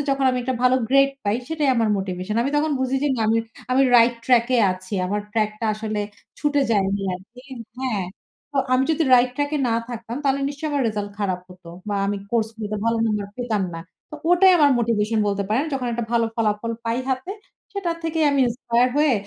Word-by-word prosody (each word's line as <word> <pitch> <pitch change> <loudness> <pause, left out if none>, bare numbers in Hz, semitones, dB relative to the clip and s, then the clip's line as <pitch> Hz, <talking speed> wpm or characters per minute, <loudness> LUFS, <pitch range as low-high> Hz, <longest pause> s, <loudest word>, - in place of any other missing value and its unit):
যখন 275 0 +1
আমি 255 - -1
একটা 260 +1 -1
ভালো 250 0 +4
গ্রেড 275 +1 +5
পাই 205 +1 +1
সেটাই 310 -3 0
আমার 230 -2 +2
মোটিভেশন। 185 +1 -4
আমি 270 - -1
তখন 305 +1 +1
বুঝি 260 +1 0
যে 295 - +2
না - - -3
আমি 225 - +3 0.3
আমি 260 +2 +4
রাইট 235 +1 +5
ট্রাক 240 -2 +4
এ - - +3
আছি। 185 +2 -11
আমার 205 +3 -1
ট্রাক 215 -2 +1
টা 230 - -2
আসলে 215 0 -3 0.4
ছুটে 290 -1 +1
যায়নি 200 -2 +1
আরকি। 205 +7 -13 0.4
হ্যাঁ, 250 -7 -1 0.5
তো - - -5 0.2
আমি 255 +1 +3
যদি 320 +1 +1
রাইট 250 0 +4
ট্রাক 290 0 -1
এ - - -1
না 230 - +1
থাকতাম 235 -1 -6
তাহলে 275 0 +1
নিশ্চয়ই 285 +2 -4
আমার 285 -1 +1
রেজাল্ট 205 -1 -4
খারাপ 190 -3 -1
হত। 180 0 -16 0.2
বা 205 - -1
আমি 205 +1 -1
কোর্সগুলোতে 220 -2 -2
ভালো 230 0 +2
নাম্বার 210 -2 -1
পেতাম 235 -5 -1
না। 165 - -5 0.3
তো - - -8 0.2
ওটাই 370 +2 +6
আমার 290 -2 +5
মোটিভেশন 225 -1 +1
বলতে 200 0 0
পারেন। 245 +7 +2
যখন 265 -2 -2
একটা 235 0 -2
ভালো 230 -1 +3
ফলাফল 220 0 0
পাই 230 +1 -1
হাতে, 260 +8 -2 0.4
সেটার 355 -4 -2
থেকেই 325 -1 0
আমি 280 -1 +2
ইন্সপায়ার 240 0 +1
হয়ে 300 -2 +4
235 Hz, 205 wpm, -22 LUFS, 210-275 Hz, 0.5 s, ওটাই